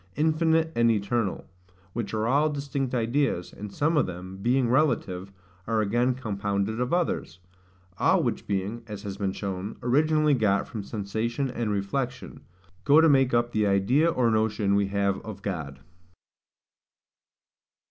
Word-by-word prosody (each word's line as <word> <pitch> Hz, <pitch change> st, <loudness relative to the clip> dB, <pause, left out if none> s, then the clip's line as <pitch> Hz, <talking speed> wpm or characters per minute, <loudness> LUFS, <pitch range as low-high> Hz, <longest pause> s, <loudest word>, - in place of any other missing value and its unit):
infinite 160 Hz, +1 st, +2 dB
and 115 Hz, 0 st, +4 dB
eternal: 105 Hz, -1 st, -1 dB, 0.5 s
which 115 Hz, -3 st, -3 dB
are 110 Hz, 0 st, -1 dB
all 145 Hz, +6 st, +3 dB
distinct 140 Hz, -3 st, -3 dB
ideas, 120 Hz, -5 st, 0 dB
and 105 Hz, 0 st, -8 dB
some 155 Hz, +9 st, +1 dB
of 145 Hz, -, +3 dB
them, 95 Hz, +1 st, -7 dB
being 120 Hz, +5 st, +1 dB
relative, 115 Hz, -8 st, 0 dB, 0.4 s
are 110 Hz, 0 st, +1 dB
again 120 Hz, +4 st, +1 dB
compounded 105 Hz, -1 st, -2 dB
of 125 Hz, -, -1 dB
others: 170 Hz, -, -1 dB, 0.6 s
all -, -, +3 dB
which -, -, -2 dB
being, 100 Hz, +4 st, -2 dB
as 105 Hz, -1 st, -7 dB
has 100 Hz, -2 st, -5 dB
been 100 Hz, -1 st, -1 dB
shown, 95 Hz, +1 st, -5 dB
originally 150 Hz, +4 st, +3 dB
got 105 Hz, -6 st, +1 dB
from 110 Hz, -, -5 dB
sensation 110 Hz, +6 st, -3 dB
and 120 Hz, -3 st, -2 dB
reflection, 120 Hz, +5 st, -3 dB, 0.4 s
go 150 Hz, +2 st, +6 dB
to 165 Hz, -, +6 dB
make 135 Hz, -3 st, +4 dB
up 120 Hz, 0 st, +1 dB
the 105 Hz, -2 st, +1 dB
idea 120 Hz, +12 st, +3 dB
or 125 Hz, -7 st, +2 dB
notion 110 Hz, -2 st, +1 dB
we 100 Hz, 0 st, +2 dB
have 100 Hz, -1 st, 0 dB
of 100 Hz, -3 st, -8 dB
God. 75 Hz, -8 st, -4 dB
115 Hz, 145 wpm, -26 LUFS, 100-135 Hz, 0.6 s, go